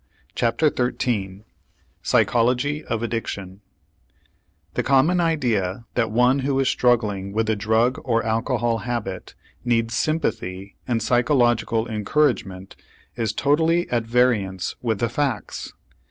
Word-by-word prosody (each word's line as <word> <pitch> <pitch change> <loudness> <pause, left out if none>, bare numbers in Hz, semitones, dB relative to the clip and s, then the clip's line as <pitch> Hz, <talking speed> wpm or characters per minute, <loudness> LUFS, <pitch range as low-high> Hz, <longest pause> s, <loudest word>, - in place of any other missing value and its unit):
CHAPTER 120 +6 +1
XIII 110 -6 -2 0.6
PSYCHOLOGY 125 +6 +1
OF 115 0 -2
ADDICTION 100 -4 -4 1.1
The - - 0
common 140 +7 +3
idea 120 - 0
that 115 -3 0
one 125 +4 +3
who 135 0 0
is 135 - +2
struggling 105 -6 +1
with 110 +1 0
a - - +1
drug 110 +4 +1
or 115 -3 0
alcohol 115 +1 0
habit 110 -5 -5 0.3
needs 115 -2 0
sympathy 100 - -2
and 115 -3 0
psychological 120 -2 +2
encouragement 105 -4 -1 0.4
is 115 -2 -1
totally 160 +4 +2
at 120 -2 0
variance 110 -7 +1
with 115 -4 0
the 120 - 0
facts. 130 -2 -3
115 Hz, 115 wpm, -23 LUFS, 110-130 Hz, 1.1 s, common